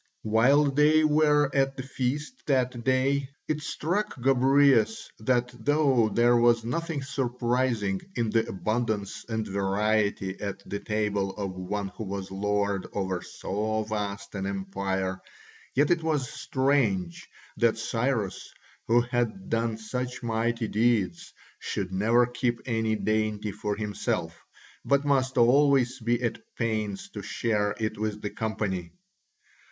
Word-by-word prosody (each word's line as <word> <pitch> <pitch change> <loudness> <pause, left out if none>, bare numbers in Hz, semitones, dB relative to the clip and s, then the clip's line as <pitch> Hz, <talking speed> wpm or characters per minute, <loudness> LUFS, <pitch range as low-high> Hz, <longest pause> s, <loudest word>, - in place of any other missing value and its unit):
While 135 +7 +4
they 150 +3 +4
were 150 -2 +4
at 135 0 +1
the 130 - -4
feast 135 - -3
that 125 -4 +1
day 135 +1 +1 0.2
it 155 0 -1
struck 175 +4 -2
Gobryas 130 -2 +3
that 125 +2 +1
though 140 -6 +3
there 120 +2 +4
was 120 -1 +4
nothing 155 +3 -2
surprising 120 -6 0
in 115 -2 0
the 115 0 +1
abundance 110 0 -2
and 110 -1 -1
variety 100 0 0
at 100 -1 -5
the 100 - -3
table 105 -2 -1
of 100 -2 -3
one 95 +2 -3
who 105 - -8
was 95 -1 -5
lord 100 0 -1
over 95 -2 -2
so 110 +4 -2
vast 100 -2 -4
an 95 -1 -3
empire, 95 -1 -2 0.5
yet 145 +4 +3
it 170 -1 +3
was 155 -5 0
strange 120 -11 0 0.3
that 115 0 +3
Cyrus, 115 -2 -2 0.4
who 120 +1 +5
had 120 - -2
done 115 -1 0
such 125 +3 -4
mighty 115 0 0
deeds, 105 -6 +1 0.3
should 95 -2 -3
never 115 +6 +4
keep 120 -1 -1
any 110 -2 0
dainty 110 -1 -1
for 105 +1 -3
himself, 105 -1 -2 0.5
but 140 +1 +2
must 135 -2 +1
always 130 +1 +4
be 120 +1 +1
at 115 -2 -1 0.2
pains 110 -4 -2
to 105 - -7
share 105 0 -1
it 110 -1 -3
with 105 -1 -3
the 105 - -3
company. 100 -6 -3
115 Hz, 135 wpm, -27 LUFS, 105-130 Hz, 0.5 s, who